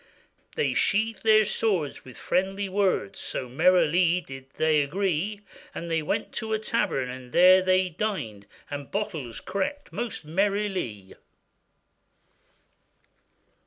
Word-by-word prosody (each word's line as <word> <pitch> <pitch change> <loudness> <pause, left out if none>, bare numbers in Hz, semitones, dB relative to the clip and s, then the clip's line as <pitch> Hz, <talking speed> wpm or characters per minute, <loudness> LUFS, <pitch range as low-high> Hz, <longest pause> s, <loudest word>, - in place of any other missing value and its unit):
They 470 - +1
sheathèd 220 +2 +1
their 215 -1 +5
swords 190 -8 -1
with 130 -2 -13
friendly 195 +2 -1
words, 190 - 0
So 130 - -4
merrily 175 +4 +3
they 135 0 -7
did 135 +1 -28 0.3
agree; 195 +4 -1 0.3
They 165 -1 -2
went 150 - -2
to 220 0 -3
a - - +2
tavern 215 - -1
and 125 0 -9
there 185 +4 +7
they 185 0 +2
dined, 155 - -4 0.2
And 145 -1 -5
bottles 165 - -4
cracked 200 +10 -4
most 235 -9 -4
merrilie. 190 - -1
185 Hz, 115 wpm, -26 LUFS, 145-205 Hz, 0.3 s, there